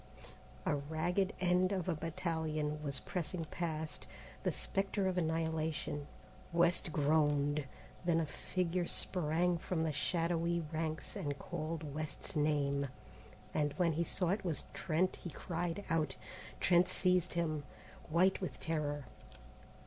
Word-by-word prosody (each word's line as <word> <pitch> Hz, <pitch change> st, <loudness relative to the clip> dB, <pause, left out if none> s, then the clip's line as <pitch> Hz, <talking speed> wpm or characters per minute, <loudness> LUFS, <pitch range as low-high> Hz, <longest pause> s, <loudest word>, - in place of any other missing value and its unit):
A -, -, +3 dB
ragged 175 Hz, +7 st, 0 dB
end 180 Hz, +1 st, +3 dB
of 185 Hz, -3 st, -1 dB
a 180 Hz, -, +2 dB
battalion 155 Hz, -2 st, -1 dB
was 140 Hz, -2 st, -1 dB
pressing 175 Hz, -1 st, -3 dB
past, 160 Hz, -1 st, -3 dB, 0.3 s
the -, -, +1 dB
spectre 195 Hz, 0 st, 0 dB
of 185 Hz, -, +1 dB
annihilation. 160 Hz, -3 st, 0 dB, 0.4 s
West 170 Hz, 0 st, +3 dB
groaned. 145 Hz, -1 st, +3 dB, 0.4 s
Then 170 Hz, -2 st, +3 dB
a 165 Hz, -, +1 dB
figure 175 Hz, +3 st, -1 dB
sprang 175 Hz, 0 st, +2 dB
from 165 Hz, -1 st, -1 dB
the 160 Hz, -2 st, 0 dB
shadowy 170 Hz, +1 st, +1 dB
ranks 160 Hz, +2 st, -2 dB
and 145 Hz, -8 st, -2 dB
called 155 Hz, -1 st, -4 dB
West's 155 Hz, -1 st, -4 dB
name, 140 Hz, -2 st, +2 dB, 0.7 s
and 145 Hz, -2 st, +1 dB
when 175 Hz, -3 st, +2 dB
he 165 Hz, +3 st, +1 dB
saw 180 Hz, +1 st, 0 dB
it 195 Hz, +2 st, +1 dB
was 165 Hz, -7 st, -1 dB
Trent 175 Hz, +3 st, +1 dB
he 175 Hz, -, -6 dB
cried 175 Hz, +3 st, -3 dB
out. 155 Hz, -5 st, +1 dB, 0.4 s
Trent 175 Hz, 0 st, +5 dB
seized 180 Hz, -1 st, +2 dB
him, 155 Hz, -3 st, 0 dB, 0.5 s
white 180 Hz, +5 st, +4 dB
with 185 Hz, -, -4 dB
terror. 145 Hz, -3 st, -1 dB
165 Hz, 130 wpm, -36 LUFS, 150-180 Hz, 0.7 s, Trent